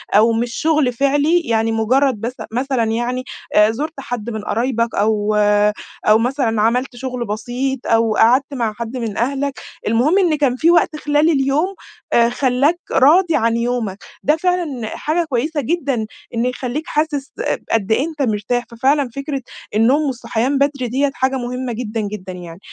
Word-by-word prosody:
أو 225 +2 +5
مش 235 +1 -1
شُغل 305 -5 +1
فعليّ، 290 +6 +2
يعني 225 -6 0
مجرد 235 +2 +2
بس 235 +2 -3 0.2
مثلًا 255 +1 0
يعني 240 +3 -1 0.3
آآ 210 +1 +6
زُرت 300 +8 -4
حد 240 -4 -5
من 220 -2 -4
قرايبك 230 +1 -1
أو 210 0 +1 0.7
أو 215 +1 +7
مثلًا 235 -2 0
عملت 250 +4 +1
شُغل 250 -1 -4
بسيط، 245 +5 -3
أو 225 -1 +2
قعدت 255 +6 +3
مع 230 -5 -1
حد 235 +3 -5
من 225 -4 -4
أهلك، 275 +3 -1 0.3
المهم 250 - +3
إن 350 -5 +3
كان 280 -4 +1
في 325 +6 +3
وقت 340 -2 +3
خلال 295 +1 +2
اليوم 295 +6 +1 0.4
آآ 235 0 +5
خلّاك 265 +6 +1
راضي 330 +6 +5
عن 230 +1 +2
يومك، 235 -5 -1 0.3
ده 300 - +3
فعلًا 320 -9 -1
حاجة 330 +3 0
كويسة 290 +4 -1
جدًا 270 -6 -1 0.3
إن 230 +1 0
يخلّيك 250 +3 -3
حاسِس 295 -2 -1 0.4
قد 220 -2 0
إيه 260 +7 +3
أنت 310 -3 -6
مرتاح، 240 0 0
ففعلًا 270 +3 +1
فكرة 275 0 -3 0.3
النوم 245 +7 +4
والصحيان 245 +1 -1
بدري 275 -2 0
ديّة 275 +4 0
حاجة 265 -3 0
مهمة 250 0 -4
جدًا، 225 -1 -3
جدًا 200 -3 -5
يعني، 175 -1 -9
250 Hz, 160 wpm, -19 LUFS, 225-285 Hz, 0.7 s, أو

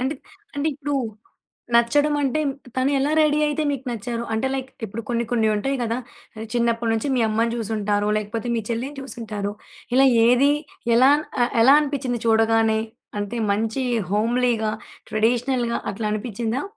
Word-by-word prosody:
అంటే 265 +4 -1 0.4
అంటే 285 +2 -1
ఇప్పుడు 290 0 -3 0.8
నచ్చడం 290 +6 +4
అంటే 285 +2 0 0.4
తను 260 +2 +2
ఎలా 280 +2 +1
రెడీ 300 -1 +3
అయితే 300 +1 -1
మీకు 275 -2 -4
నచ్చారు? 235 +1 -4
అంటే 220 +4 0
లైక్ 265 -1 -4
ఇప్పుడు 220 +2 -6
కొన్ని 235 -1 0
కొన్నుంటాయి 225 +3 +1
గదా! 230 +1 -1 0.5
చిన్నప్పటి 235 -1 +1
నుంచి 225 +5 -1
మీ - - +2
అమ్మని 230 +2 +1
చూసింటారు, 210 -2 -1
లేకపోతే 215 +2 -3
మీ 230 - 0
చెల్లిని 250 +5 -3
చూసుంటారు, 215 -6 -5 0.4
ఇలా 270 +1 +6 0.2
ఏది 250 +4 +5 0.4
ఎలా 260 +3 +6 0.3
ఆహ్, 240 - +1
ఎలా 270 +4 +7
అనిపిచ్చింది 270 -5 -2
చూడగానే? 225 0 +3 0.4
అంటే 205 +3 -3 0.2
మంచి 220 +5 -1 0.3
హోమ్లీగా, 230 0 +1 0.4
ట్రెడిషనల్‌గా 235 +2 +1
అట్లా 215 +2 -4
అనిపిచ్చిందా? 225 +3 -2
235 Hz, 140 wpm, -23 LUFS, 220-265 Hz, 0.8 s, ఎలా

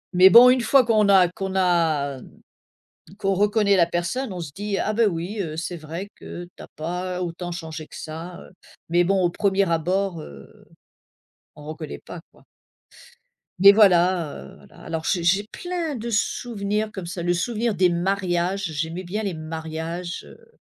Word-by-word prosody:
Mais 185 +1 +8
bon, 240 +3 +9
une 255 -1 +2
fois 260 +1 +4
qu'on 215 -3 +3
a 185 -2 +6
qu'on 190 0 -5
a 160 -7 +1
hem, - - -14 0.9
qu'on 195 -2 0
reconnaît 205 +1 +2
la 170 -2 +5
personne, 175 +9 -3
on 180 - -6
se 150 -4 -7
dit: 205 -1 -3
«Ah, 215 - -1
ben, 225 -1 +3
oui, 180 +5 -5
heu, 155 -3 -5
c'est 175 +1 -4
vrai 165 +5 -7
que 175 - -9
tu - - -11
as - - -13
pas 180 +3 -4
autant 175 0 -5
changé 160 -2 -7
que - - -12
ça», 165 +3 -7
heu, - - -13 0.4
mais 175 +2 +3
bon 195 +1 +1
au 175 - +3
1er 195 0 +1
abord, 175 +1 -1
heu, 70 - -12 1.1
on 150 -1 -13
reconnaît 155 - -7
pas - - -9
quoi. - - -24 1.1
Mais 200 +1 +10
voilà, 180 -5 +4
heu, 70 +1 -11
voilà. - - -18
Alors 160 -1 -4
j'ai 175 -2 0
j'ai 195 +4 +3
plein 335 +4 -4
de 235 +1 -5
souvenirs 210 -1 -1
comme 190 -3 -7
ça. 175 0 -5
Le 175 +1 +1
souvenir 225 +3 -1
des 180 0 +3
mariages, 185 +1 -1
j'aimais 160 +4 -4
bien 200 +5 -4
les 190 -5 -3
mariages, 160 +2 -5
heu 465 0 -19
180 Hz, 180 wpm, -23 LUFS, 170-205 Hz, 1.1 s, Mais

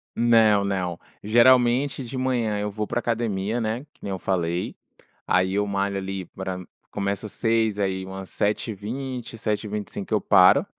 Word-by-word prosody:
Não, 110 -4 +4
não, 90 -3 -2 0.2
geralmente 125 +4 +4
de 125 +2 -6
manhã 120 -5 0
eu 105 - -1
vou 105 +1 -3
pra 120 - -1
academia, 115 -1 -1
né, 115 +6 -2
que - - -26
nem 100 - -4
eu 95 - -3
falei. 85 -2 -1 0.5
Aí 95 +1 +2
eu 105 0 +2
malho 100 0 -1
ali 95 -1 -4
pra 95 -1 -5 0.3
começo 100 +1 -2
às - - -8
6h, 110 -2 +1
aí 95 -1 -1
umas 95 0 -8
7h20, 115 +4 -3
7h25 105 -1 -3
eu 105 - +4
paro. 90 -1 +6
105 Hz, 155 wpm, -24 LUFS, 95-115 Hz, 0.5 s, paro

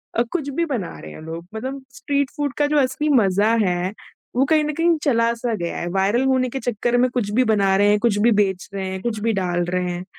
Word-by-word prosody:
अ, 230 - +3
कुछ 310 -5 -2
भी 335 +5 -1
बना 245 - -4
रहे 75 - -10
हैं - - -10
लोग 165 +1 -7
मतलब 265 +5 -5
स्ट्रीट 280 -1 -1
फूड 290 -2 -1
का 290 - +2
जो 300 +1 +1
असली 295 +3 -1
मज़ा 200 +3 +2
है 180 +1 -1 0.4
वो 260 +2 +3
कहीं 310 +1 +3
न 300 0 -2
कहीं 330 +2 +2
चला-सा 235 -2 +1
गया 170 -4 -4
है। 175 - -3
वायरल 195 +7 +1
होने 260 -1 +2
के 270 - -4
चक्कर 240 0 0
में 250 +1 +3
कुछ 240 -5 -2
भी 250 +5 +3
बना 200 -4 +2
रहे 205 +1 +4
हैं, 210 0 +3
कुछ 220 -2 +1
भी 235 +3 +4
बेच 195 -4 +1
रहे 195 -1 -3
हैं, 190 0 -5
कुछ 225 -1 -2
भी 225 +2 0
डाल 175 -3 0
रहे 180 0 -1
हैं। 175 0 -5
230 Hz, 250 wpm, -21 LUFS, 190-265 Hz, 0.4 s, रहे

